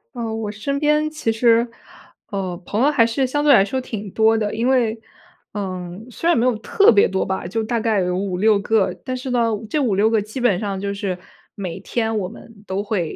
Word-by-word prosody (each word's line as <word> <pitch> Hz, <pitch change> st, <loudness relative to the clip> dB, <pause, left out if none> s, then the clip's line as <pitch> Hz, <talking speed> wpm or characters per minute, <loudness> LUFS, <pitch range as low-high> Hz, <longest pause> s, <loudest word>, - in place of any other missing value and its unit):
呃， 230 Hz, -2 st, -3 dB
我 215 Hz, -2 st, -3 dB
身 275 Hz, +7 st, -3 dB
边 300 Hz, +1 st, +2 dB
其 305 Hz, -7 st, -2 dB
实， 230 Hz, +1 st, +3 dB, 0.6 s
呃， 185 Hz, -3 st, -3 dB
朋 215 Hz, +4 st, -1 dB
友 290 Hz, -, +5 dB
还 255 Hz, -6 st, +4 dB
是 250 Hz, +3 st, 0 dB
相 290 Hz, +3 st, -1 dB
对 295 Hz, -, +6 dB
来 195 Hz, -, +7 dB
说 235 Hz, +7 st, -2 dB
挺 215 Hz, -5 st, -6 dB
多 220 Hz, +2 st, +3 dB
的， 210 Hz, -2 st, -1 dB
因 230 Hz, +3 st, 0 dB
为， 235 Hz, -4 st, +2 dB, 0.5 s
嗯， 185 Hz, +1 st, -5 dB
虽 330 Hz, -, -4 dB
然 345 Hz, -, +5 dB
没 235 Hz, -, +2 dB
有 250 Hz, -, +2 dB
特 395 Hz, -, +4 dB
别 205 Hz, -, +5 dB
多 190 Hz, 0 st, -1 dB
吧， 190 Hz, -1 st, -3 dB
就 220 Hz, +6 st, -2 dB
大 230 Hz, +1 st, -1 dB
概 220 Hz, -3 st, +1 dB
有 180 Hz, 0 st, 0 dB
5-6 200 Hz, +2 st, +2 dB
个。 210 Hz, 0 st, +1 dB
但 255 Hz, -1 st, -2 dB
是 255 Hz, +1 st, -5 dB
呢， 235 Hz, -2 st, +2 dB, 0.2 s
这 305 Hz, -, 0 dB
5-6 215 Hz, -5 st, +2 dB
个 225 Hz, -1 st, +2 dB
基 215 Hz, +5 st, -7 dB
本 235 Hz, -8 st, +2 dB
上 200 Hz, -2 st, -3 dB
就 200 Hz, 0 st, -2 dB
是 195 Hz, -2 st, -3 dB, 0.4 s
每 185 Hz, -4 st, -5 dB
天 225 Hz, -2 st, -2 dB
我 185 Hz, -, -1 dB
们 220 Hz, 0 st, -14 dB
都 195 Hz, +2 st, -2 dB
会 195 Hz, -7 st, -2 dB
220 Hz, 230 characters per minute, -21 LUFS, 200-245 Hz, 0.6 s, 来